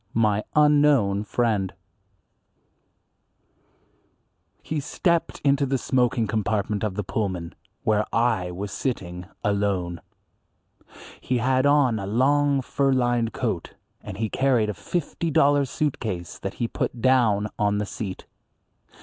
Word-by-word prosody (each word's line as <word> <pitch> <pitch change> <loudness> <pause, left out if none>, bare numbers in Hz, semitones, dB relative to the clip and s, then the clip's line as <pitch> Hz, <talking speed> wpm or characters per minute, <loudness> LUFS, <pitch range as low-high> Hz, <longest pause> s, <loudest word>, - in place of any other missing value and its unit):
IV. 100 - -33
My 105 -2 +2
Unknown 145 -9 +4
Friend 105 -4 0 2.9
HE 155 - -2
STEPPED 170 +4 -1
into 140 0 +3
the 135 +1 +1
smoking 125 -2 +1
compartment 105 -1 -1
of 105 -3 -2
the 105 - -2
Pullman, 95 -4 -3 0.3
where 105 -1 +2
I 115 -6 +1
was 95 +3 -5
sitting 90 -8 -4 0.2
alone. 100 -4 -1 1.2
He 130 - 0
had 130 +3 +2
on 140 -6 +3
a 95 - -5
long 140 +5 +2
fur 135 +2 +1
lined 120 -3 +1
coat, - - -3 0.3
and 95 - -8
he 110 +1 -1
carried 120 -3 +1
a - - -6
fifty 170 - -3
dollar 145 -2 +4
suit 145 +2 -2
case 90 -6 -5
that 95 - -5
he 120 - -1
put 120 - -3
down 115 -5 +3
on 105 0 +2
the 105 - -1
seat. 100 -2 -6
115 Hz, 130 wpm, -24 LUFS, 100-135 Hz, 2.9 s, Unknown